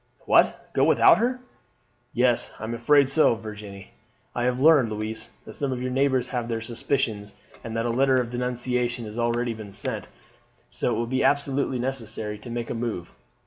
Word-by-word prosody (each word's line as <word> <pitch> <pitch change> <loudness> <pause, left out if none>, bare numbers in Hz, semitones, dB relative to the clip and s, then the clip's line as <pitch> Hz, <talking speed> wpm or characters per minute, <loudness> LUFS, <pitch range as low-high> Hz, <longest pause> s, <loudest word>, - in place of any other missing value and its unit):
"What, - - +2
go - - +2
without - - +6
her?" 250 +2 0 0.7
"Yes, 125 0 +2
I - - -8
am 110 +1 -3
afraid 140 +4 +4
so, 135 -3 +4
Virginie. 105 -3 -9 0.4
I 120 - -1
have 125 0 0
learned, 145 -5 +5
Louise, 110 +1 -3 0.2
that - - -10
some 140 -2 -2
of 125 - -3
your 130 0 -3
neighbours 130 -1 +1
have 120 -2 -2
their 115 -1 -2
suspicions, 115 -3 -2 0.3
and 115 0 -5
that 115 - -1
a 120 - 0
letter 130 +2 +3
of 120 -1 -3
denunciation 125 -1 -1
has 105 +2 -7
already 120 0 0
been 110 -2 -9
sent, 100 - -4 0.6
so - - -1
it - - 0
will 120 - 0
be 130 +2 0
absolutely 140 -1 +1
necessary 110 -4 -3
to 115 - -10
make 120 0 -4
a - - -1
move. 115 -7 -4
120 Hz, 185 wpm, -25 LUFS, 110-130 Hz, 0.7 s, without